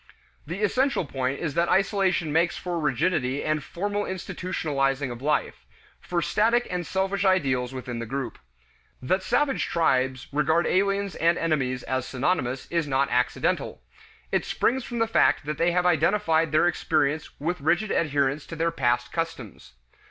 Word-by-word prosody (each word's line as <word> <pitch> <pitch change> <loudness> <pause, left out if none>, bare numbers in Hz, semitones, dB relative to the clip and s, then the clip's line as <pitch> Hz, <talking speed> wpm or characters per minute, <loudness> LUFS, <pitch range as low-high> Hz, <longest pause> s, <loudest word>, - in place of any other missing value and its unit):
The 180 +6 -4
essential 255 - +1
point 135 -1 -2
is 160 -4 -2
that 170 +1 +1
isolation 195 -4 +2
makes 170 +2 +2
for 175 -2 -3
rigidity 140 -2 0
and 155 -1 -1
formal 205 +6 -2
institutionalizing 145 -8 -2
of 120 0 -8
life, 150 +2 -1 0.4
for 170 -1 -2
static 235 +3 +2
and 175 -3 -3
selfish 190 +2 -1
ideals 135 -10 +2
within 125 -2 -5
the 115 - -5
group. 135 +1 -4 0.6
That 185 +10 0
savage 270 +9 +1
tribes 130 -5 +1
regard 160 +4 +2
aliens 200 +1 +1
and 170 +1 +2
enemies 130 -6 -1
as 130 -1 -2
synonymous 130 -2 -1
is 170 -3 0
not 135 0 +1
accidental. 125 - 0 0.5
It - - +1
springs 260 +1 0
from 240 - -6
the 225 - +3
fact 220 - +3
that 150 0 -4
they 170 +1 +3
have 180 +1 +1
identified 165 -1 +2
their 155 +2 +4
experience 155 -3 0
with 165 +2 -2
rigid 175 +8 +1
adherence 145 -2 0
to 165 - -7
their 165 +1 0
past 120 -2 0
customs. 130 - -5
160 Hz, 155 wpm, -25 LUFS, 135-185 Hz, 0.6 s, their